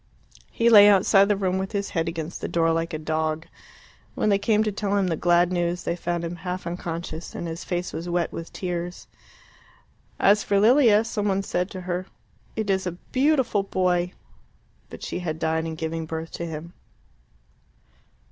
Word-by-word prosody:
He 230 - 0
lay 205 -3 +9
outside 195 0 +5
the 205 - +3
room 190 -1 0
with 190 +3 -4
his 200 -1 -2
head 165 -1 -1
against 165 0 -6
the - - -2
door 165 -1 +2
like 165 +1 -1
a 155 - -3
dog. 155 +1 -2 0.7
When - - +1
they 200 -1 +3
came 215 0 +2
to 215 - -1
tell 205 0 -1
him 195 - +2
the 165 - 0
glad 175 +2 +3
news 175 0 -1
they 170 - -1
found 175 -1 -3
him 170 +1 -5
half 180 +1 -5
unconscious, 170 -1 -5
and 170 - -4
his 165 +2 -5
face 180 0 -3
was 165 +2 -5
wet 175 -1 0
with 165 - -7
tears. 175 -1 -4 1.1
As 205 +1 +4
for 200 -1 +2
Lilia, 225 -1 +5
some 215 -2 -2
one 195 0 +1
said 180 -1 -1
to 185 - -7
her, 180 +1 -3 0.5
"It 220 -3 -1
is 190 -1 0
a 180 - -2 0.2
beautiful 265 -6 +2
boy!" 180 -2 0 0.8
But - - -10
she - - -3
had 160 -3 -3
died 160 0 -1
in 160 - -4
giving 160 0 -4
birth 160 0 -5
to 170 - -5
him. 165 +2 -7
180 Hz, 185 wpm, -25 LUFS, 165-200 Hz, 1.1 s, lay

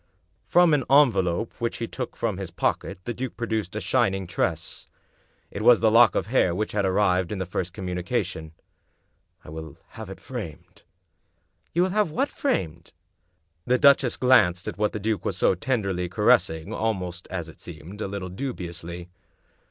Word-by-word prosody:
From 175 -2 +5
an 145 -3 +2
envelope 110 -8 +3
which 115 0 -2
he 115 - -3
took 125 +1 -6
from 110 -5 -2
his 95 -3 -5
pocket - - -2
the 120 - -3
duke 130 +1 -5
produced 110 -5 -2
a - - -1
shining 95 0 +1
tress. 85 -2 -3 0.6
It 100 - -5
was 120 +1 +6
the 110 -1 +3
lock 120 +2 +6
of - - 0
hair 105 -7 +2
which 105 +3 -2
had 100 -2 0
arrived 95 -2 +2
in 105 - -3
the 95 - -2
first 90 0 -3
communication. 90 -2 -3 0.4
" 85 +1 -44
I - - -10
will 80 -2 -8
have - - -9
it - - -9
framed." - - -8 0.9
"You 175 - +2
will 185 - +1
have 210 -2 +2
what 270 - 0
framed?" 85 - -2 0.7
The 125 +1 +3
duchess 135 -1 +4
glanced 90 -9 +4
at - - -5
what 105 0 +2
the 105 - -4
duke 105 -1 -1
was - - -2
so - - +3
tenderly 95 -4 -1
caressing, 90 -5 +2
almost, 90 -5 -3
as 85 -4 -4
it 80 - -14
seemed, 85 +5 -9
a - - -2
little 95 -2 -5
dubiously. 90 -6 -6
95 Hz, 175 wpm, -25 LUFS, 90-120 Hz, 0.9 s, was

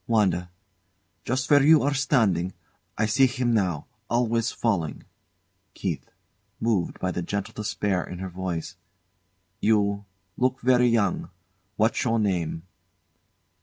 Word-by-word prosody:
WANDA. 95 -6 +2 0.8
Just 130 +1 -1
where 145 -1 +7
you 155 +1 +6
are 145 +1 +1
standing. 110 - +1 0.4
I 110 - +2
see 130 +5 +4
him 125 -1 0
now, 90 -9 0 0.2
always 115 -1 +1
falling. 95 -10 -1 0.7
KEITH. - - -4 0.5
[Moved 110 -6 0
by 90 - -1
the 90 - -3
gentle 100 +3 -3
despair 100 -3 -1
in 90 - -8
her 95 +1 -5
voice] 90 -1 -4 0.8
You 100 -2 +2 0.3
look 130 +1 +1
very 125 0 +4
young. 110 -5 +1 0.5
What's 110 +2 +1
your 115 -1 +1
name? 90 -6 -1
105 Hz, 125 wpm, -25 LUFS, 95-125 Hz, 0.8 s, where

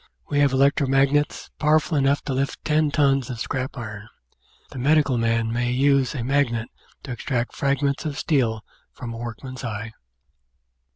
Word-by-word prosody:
We 145 - +1
have 140 -2 +4
electro 140 +1 +3
magnets, 140 +2 +1
power 155 +1 +4
ful 155 - -4
enough 140 0 +2
to 135 - -3
lift 135 +1 -2
ten 155 0 +2
tons 140 -3 +2
of 120 -3 -5
scrap 130 +2 -3
iron; 110 -2 -7 0.6
the 130 - -7
medical 145 0 +3
man 115 -1 +1
may 120 +1 0
use 135 +1 +2
a 125 - -3
magnet 120 -3 0 0.3
to 135 - -7
extract 125 0 -2
fragments 140 0 0
of 150 -2 -4
steel 115 -8 0 0.3
from 120 -2 -7
a - - -7
workman's 120 +2 -7
eye. 110 -1 -4
135 Hz, 165 wpm, -23 LUFS, 120-140 Hz, 0.6 s, have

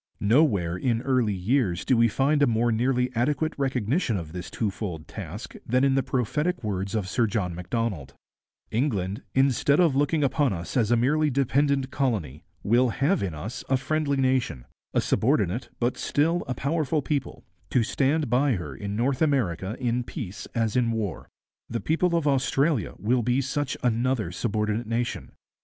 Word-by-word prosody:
Nowhere 100 - +2
in 115 +3 0
early 125 -6 +1
years 95 -1 0
do 130 - +3
we 115 0 +5
find 140 +6 +1
a 145 - +5
more 120 +1 +2
nearly 125 +2 +1
adequate 145 +6 0
recognition 130 - 0
of 80 -4 -6
this 90 0 -6
twofold 95 -6 -4
task - - -7
than 130 +3 +1
in 135 -1 +4
the 135 - +3
prophetic 150 +7 -1
words 100 -1 -2
of 105 -4 -1
Sir 115 +4 +1
John 100 -4 -1
Macdonald: 90 - -3 0.6
'England, 105 -6 -1
instead 135 +2 +3
of 165 -6 +4
looking 145 +2 +2
upon 140 -3 +2
us 85 -1 -6
as 115 -5 +2
a 120 - +4
merely 150 +6 +2
dependent 140 0 +1
colony, 100 - -2 0.2
will 120 +4 +3
have 140 +11 +1
in 90 -5 -2
us 100 +11 -6
a 135 - +3
friendly 140 +1 0
nation, 130 - 0 0.3
a - - +2
subordinate 115 - +1
but 120 +1 0
still 165 +4 +1
a 125 - -2
powerful 150 +2 0
people, 140 -3 -3 0.3
to 125 - +2
stand 140 +6 +1
by 130 +3 +2
her 80 - -5
in 100 +8 -5
North 130 +5 0
America 110 - 0
in 125 -1 0
peace 110 - -7
as 115 -2 0
in 125 -2 +2
war. 110 -6 -3 0.4
The 115 - -2
people 170 +5 +1
of 165 -3 +1
Australia 140 - +1
will 120 +4 +1
be 125 +3 +1
such 140 +1 -2
another 120 -4 +1
subordinate 105 +2 -1
nation.... 120 +1 -3
125 Hz, 170 wpm, -26 LUFS, 105-140 Hz, 0.6 s, we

